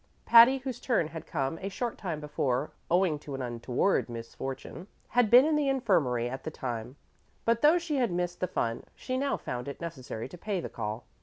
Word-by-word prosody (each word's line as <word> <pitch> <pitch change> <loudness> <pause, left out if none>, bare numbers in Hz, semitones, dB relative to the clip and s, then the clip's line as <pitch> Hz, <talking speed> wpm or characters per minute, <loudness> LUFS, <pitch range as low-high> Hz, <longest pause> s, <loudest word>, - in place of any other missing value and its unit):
Patty, 235 +3 +8
whose 260 -1 -5
turn 220 - +1
had 160 -1 -8
come 140 +1 -2
a 195 - -3
short 235 +4 -3
time 170 -6 -4
before, 145 -2 -1 0.2
owing 175 -3 +2
to 145 -2 -7
an 135 - -4
untoward 120 +8 0
misfortune, 130 +8 -7 0.2
had 245 -3 +3
been 250 +4 +8
in 310 0 +2
the 295 -2 +2
infirmary 165 - +2
at 130 +2 -6
the - - -3
time; 125 -4 -5 0.5
but, 230 0 +2
though 305 +4 +6
she 335 -4 -2
had 245 -6 +1
missed 175 0 -2
the 185 - 0
fun, 115 -7 -2
she 255 - -4
now 275 +1 0
found 125 +1 -5
it 140 - -6
necessary 130 -9 -6
to 170 +6 -12
pay 205 -1 -2
the - - -5
call. 110 +1 -5
170 Hz, 205 wpm, -29 LUFS, -, 0.5 s, Patty